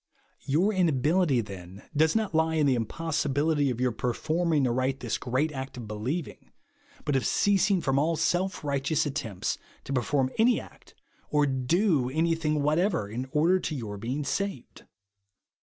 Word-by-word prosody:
Your 175 +10 +2
inability, 160 - +2
then, 95 -2 -10
does 160 +4 +3
not 220 -4 0
lie 160 0 +2
in 155 -2 +3
the 135 - +4
impossibility 145 +3 0
of 120 -2 -3
your 125 0 +2
performing 155 +6 0
aright 130 +2 0
this 120 - -2
great 130 +5 0
act 135 -2 -6
of 120 -3 -7
believing, 125 +11 -4 0.6
but 145 - 0
of 130 - +2
ceasing 195 - +2
from 135 -2 +1
all 165 +3 +1
such 160 +1 0
self 185 0 -1
righteous 140 +2 0
attempts 135 -10 -3 0.2
to 140 - -5
perform 130 +2 +1
any 235 +2 +4
act, - - -15 0.3
or 150 -1 +3
do 140 - +1
anything 155 0 0
whatever, 160 - +1
in 120 +5 -5
order 170 +5 +3
to 155 - -3
your 105 -6 -5
being 130 +7 -3
saved. 140 0 -4
145 Hz, 155 wpm, -28 LUFS, 130-165 Hz, 0.6 s, the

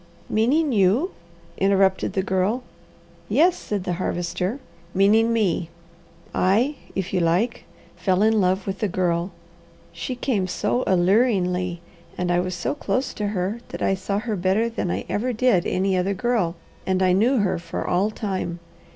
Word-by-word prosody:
"Meaning 275 +8 +2
you?" 220 - +3 0.5
interrupted 195 0 +2
the 190 - 0
Girl. 190 +6 0 0.7
"Yes," 325 - +4
said 205 -3 -4
the 180 - -2
Harvester, 180 +7 -2 0.4
"meaning 215 +4 +4
me. 190 -7 +1 0.6
I 230 +11 +2 0.2
if 190 -1 -3
you 185 - +2
like 175 +8 +1 0.3
fell 190 0 +2
in 220 -1 +4
love 185 +1 +1
with 195 0 -4
the 210 - +1
girl. 175 -1 0 0.6
She 255 - -5
came 230 -7 -1
so 210 +6 0
alluringly, 180 -2 +2 0.4
and 180 0 0
I 175 - +3
was 180 0 -2
so 175 - -2
close 275 -2 -2
to 210 - -2
her 200 +2 -2
that - - -5
I - - +2
saw 195 +1 -2
her 220 0 -2
better 195 +5 +1
than 225 -5 -3
I - - -2
ever 245 +4 -1
did 225 -6 +2
any 190 +1 +1
other 190 +2 0
girl, 225 -7 0 0.3
and 190 0 +2
I 185 -1 +4
knew 235 +8 +3
her 195 -5 +1
for 170 0 -5
all 190 +4 +1
time. 190 -5 -3
195 Hz, 160 wpm, -23 LUFS, 180-225 Hz, 0.7 s, Yes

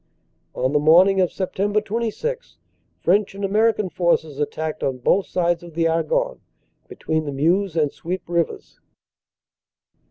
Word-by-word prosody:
"On 130 +2 0
the 150 - +3
morning 180 +6 +5
of 180 - +2
Sept. 205 +2 -1
26 235 - -3 0.4
French 195 +2 +2
and 200 0 -3
American 215 0 +2
forces 165 -5 0
attacked 155 +1 -3
on 130 -2 -1
both 185 +10 +1
sides 175 -1 0
of 170 -2 -12
the 165 0 +2
Argonne, - - 0 0.5
between 160 0 -3
the 145 - -3
Meuse 170 +6 +1
and 150 -3 +1
Suippe 180 +2 -5
rivers. 170 -1 -3
175 Hz, 135 wpm, -22 LUFS, 160-205 Hz, 0.5 s, morning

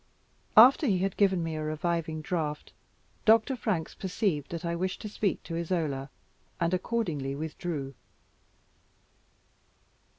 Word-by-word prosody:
After 260 +6 +8
he 195 -5 +3
had 190 +1 -1
given 190 -4 +3
me 165 -1 -3
a 155 - -3
reviving 155 0 -2
draught, 150 -3 -3 0.5
Dr. 225 +4 +4
Franks 200 -9 -2
perceived 185 - -2
that 170 0 -5
I 170 0 -1
wished 185 +2 -2
to - - -4
speak 205 -1 -1
to 165 - -5
Isola, 160 -6 -2 0.5
and 170 0 +1
accordingly 170 - -1
withdrew. 150 -2 -4
170 Hz, 125 wpm, -29 LUFS, 155-195 Hz, 0.5 s, After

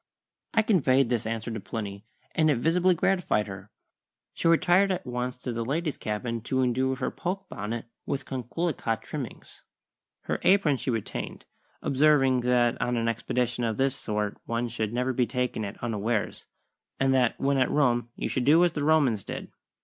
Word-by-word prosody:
I 220 - +5
conveyed 135 - +3
this 115 -2 0
answer 115 +1 -3
to 110 - -4
Plinny, 100 0 -6 0.3
and 155 -1 +3
it 145 - +3
visibly 175 +7 +3
gratified 180 - +1
her. 95 0 -9 0.6
She - - -1
retired 175 +4 +4
at 185 0 -2
once 125 0 -3
to 125 0 -5
the 115 0 -2
ladies' 150 +4 -1
cabin 115 +2 -3
to 130 +3 0
indue 130 +2 +1
her 130 - -2
poke 190 +2 -4
bonnet 110 +3 -4 0.2
with 140 - -2
coquelicot 130 - -2
trimmings. - - -7 0.6
Her - - -2
apron 180 -8 +4
she 130 - -3
retained, 115 -4 -4 0.4
observing 135 -2 +4
that 120 -1 +2
on 125 -1 0
an 115 0 0
expedition 120 +1 -1
of 110 -2 -1
this 135 0 +1
sort 105 -4 -3
one 115 +1 -1
should 110 -2 -2
never 125 +2 0
be 125 -1 +1
taken 125 -4 -1
at 100 0 -5
unawares, 110 -1 -2 0.5
and 135 0 +3
that 125 -3 +2
when 140 0 +2
at 130 - +3
Rome 120 -5 +2
you - - -2
should 130 - -1
do 160 +4 +6
as 175 - +2
the 150 -2 -3
Romans 145 -10 +3
did. - - -7
125 Hz, 175 wpm, -27 LUFS, 115-145 Hz, 0.6 s, do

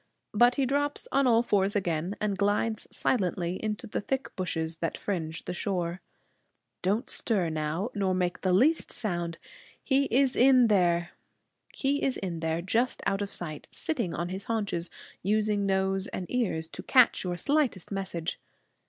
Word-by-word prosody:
But 240 +3 +5
he 275 - +2
drops 285 +2 -1
on 275 0 +3
all 230 -1 +5
fours 200 -3 +1
again, 175 -1 -1
and 210 -2 0
glides 205 +2 0
silently 180 -5 -1
into 215 +1 -2
the 215 - -3
thick 265 +5 -3
bushes 165 -3 -2
that 165 0 -2
fringe 170 -5 -3
the - - -3
shore. 180 -1 -2 0.8
Don't 205 +7 0
stir 195 -8 0
now, 160 +8 -2
nor 195 -3 0
make 180 -1 -1
the 185 - +1
least 270 - +3
sound. 175 -6 -2 0.5
He 275 0 +3
is 265 +1 +2
in 255 -2 +6
there, 175 -4 +2 0.6
just 195 - 0
out 195 +1 +1
of 200 0 -3
sight, 155 -4 -5
sitting 250 - -2
on 175 +1 -2
his 190 +2 -5
haunches, 205 -7 -2 0.3
using 210 0 +1
nose 190 0 +1
and 185 - -5
ears 195 -10 0
to - - -7
catch 255 -3 +4
your 180 -1 -2
slightest 280 - 0
message. 185 -4 -3
195 Hz, 150 wpm, -28 LUFS, 175-235 Hz, 0.8 s, in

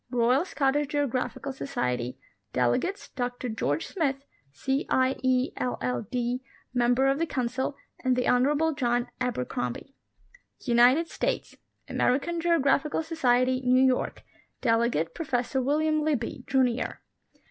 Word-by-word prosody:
Royal 250 +5 +2
Scottish 290 -3 +1
Geographical 280 -1 -2
Society; 125 - -2 0.4
delegates, 125 - 0
Dr 245 0 -3
George 160 -9 -1
Smith, 275 -6 -1 0.3
C. 265 - -2
I. 260 +1 +3
E., 260 0 +2
LL.D., 245 - -2 0.3
Member 245 +1 +3
of 270 +1 +2
the 330 - 0
Council, 260 0 -2 0.3
and 255 -1 +3
the 250 - 0
Honor 255 +4 +4
able 320 +2 +1
John 245 -3 0
Abercrombie. 230 - -3 0.7
UNITED 250 +6 +4
STATES. - - -3 0.3
American 330 +7 0
Geographical 310 -2 +2
Society 255 -5 +2
(New 255 +1 +5
York); 255 -1 0 0.4
delegate, 230 -8 +1
Pro - - -4
fessor 260 -1 0
William 310 +3 +1
Libbey, 265 -5 -2
Junior. 255 -2 +1
255 Hz, 120 wpm, -27 LUFS, 245-285 Hz, 0.7 s, New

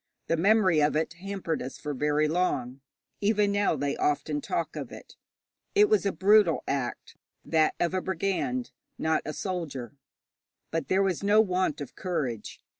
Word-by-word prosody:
The 165 - +1
memory 185 -2 +4
of 150 +1 +2
it 160 +2 0
hampered 185 -1 -4
us 130 - -6
for 150 - -4
very 150 +2 +1
long; 140 -6 -1 0.4
even 205 0 +2
now 200 -4 +2
they 140 0 -1
often 145 0 0
talk 165 +2 -3
of - - -6
it. - - -12 0.6
It 415 0 +6
was 430 - +3
a - - +1
brutal 195 0 +4
act 135 -3 -3 0.3
that 160 -1 +2
of 175 - +1
a 185 - 0
brigand, 195 +8 -2 0.3
not 160 0 +1
a 155 - -4
soldier. 150 - -4 0.8
But 165 0 -2
there 190 +1 +3
was 190 -4 0
no 205 +2 +4
want 185 -7 +1
of 140 - -7
courage. 140 - -4
170 Hz, 165 wpm, -28 LUFS, 150-195 Hz, 0.8 s, It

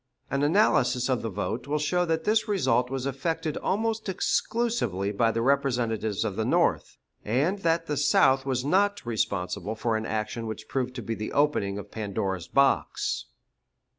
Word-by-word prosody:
An 140 - 0
analysis 135 - +3
of 130 -2 +1
the 115 - -3
vote 110 +5 -3
will 150 +1 0
show 180 +4 +1
that 160 -1 -1
this 215 +3 +2
result 125 - +1
was 135 -1 -3
effected 155 +3 -2
almost 220 +1 -1
exclusively 185 - 0
by 115 +3 +2
the 115 0 -1
representatives 120 -6 0
of 100 -4 -2
the 110 - -1
North, - - +1 0.3
and 145 - 0
that 165 -2 +1
the 150 -2 -2
South 135 -1 +4
was 130 -1 -1
not 200 +4 +2
responsible 100 -2 -2
for 115 0 -1
an 110 0 -2
action 110 +1 -3
which 110 -1 -6
proved 125 -1 -2
to 120 - -5
be 115 - -3
the 110 -1 -5
opening 140 -9 +1
of 100 - -8
Pandora's 95 -4 -3
box. 140 0 +1
130 Hz, 165 wpm, -27 LUFS, 110-160 Hz, 0.3 s, South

